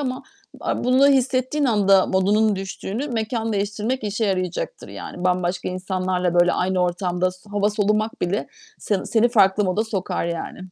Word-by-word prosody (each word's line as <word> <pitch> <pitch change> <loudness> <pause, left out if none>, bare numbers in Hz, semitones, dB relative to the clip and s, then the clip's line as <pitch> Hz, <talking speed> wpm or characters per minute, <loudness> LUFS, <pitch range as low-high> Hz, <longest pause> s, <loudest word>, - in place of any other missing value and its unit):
ama 255 -2 -3 0.4
a - - -2
bunu 255 +3 +5
hissettiğin 265 +1 +1
anda 195 -5 +4
modunun 205 +2 +2
düştüğünü 195 +7 -5
mekân 225 -1 -2
değiştirmek 210 +4 -2
işe 210 +2 -1
yarayacaktır 185 - -2
yani. 180 - -8
Bambaşka 180 0 0
insanlarla, 185 -1 -1
böyle, 175 0 +4
aynı 185 0 0
ortamda 180 0 0
s 185 +3 -17
hava 205 0 +1
solumak 215 +1 0
bile 185 +4 -1 0.3
seni 200 -3 -2
seni 235 +1 +3
farklı 205 -3 +4
moda 195 +4 0
sokar 195 -6 -2
yani. 170 -1 -5
205 Hz, 150 wpm, -22 LUFS, 185-225 Hz, 0.4 s, bunu